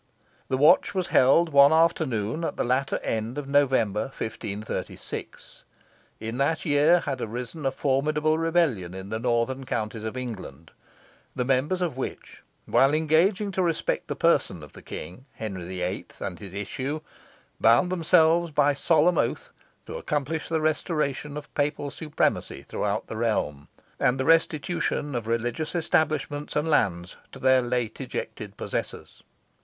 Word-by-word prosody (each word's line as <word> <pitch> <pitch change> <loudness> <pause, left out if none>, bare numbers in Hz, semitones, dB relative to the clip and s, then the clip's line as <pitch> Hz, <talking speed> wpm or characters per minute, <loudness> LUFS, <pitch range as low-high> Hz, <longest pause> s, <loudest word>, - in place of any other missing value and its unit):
The 130 - 0
watch 155 +8 +5
was 185 -2 -1
held 160 +6 +5
one 140 -1 +7
afternoon 160 -6 +1
at - - -3
the - - +1
latter 130 +3 0
end 115 +4 -2
of 145 -2 -4
November, 130 -7 +2
1536. 110 -4 -6 0.6
In 115 +3 -5
that 155 +3 +1
year 155 +3 +4
had 135 -3 -3
arisen 125 +6 -4
a - - +1
formidable 150 +4 +1
rebellion 160 - +1
in 95 +1 -7
the 110 - -2
northern 120 +3 0
counties 110 -3 -3
of 110 +3 -4
England, 95 - -7 0.6
the 125 - -1
members 135 +8 +1
of 165 -7 -1
which, 130 - -6 0.2
while 135 +3 +4
engaging 175 +7 +2
to 190 - -1
respect 170 -3 -1
the - - -3
person 80 - +1
of 75 - -13
the - - -12
king, 110 +10 -8
Henry 95 -6 -6
VIII., 90 0 -3
and 90 - -5
his 100 -2 -9
issue, 130 +9 -3 0.6
bound 120 +11 +4
themselves 170 -1 +4
by 145 -1 +3
solemn 165 +4 +3
oath - - -1 0.3
to - - -6
accomplish 150 +2 -2
the 160 -1 0
restoration 150 -1 -1
of 150 - -9
Papal 145 -1 -1
supremacy 150 0 -1
throughout 105 +1 -2
the 110 - -7
realm, 105 -11 -1 0.3
and 125 +2 +2
the 130 - 0
restitution 160 -2 +1
of 120 -3 -3
religious 120 +8 -2
establishments 155 -3 0
and 150 +2 +1
lands 90 - +1
to - - -10
their 130 0 +4
late 120 -2 -2
ejected - - -6
possessors. - - -5
135 Hz, 150 wpm, -26 LUFS, 115-155 Hz, 0.6 s, one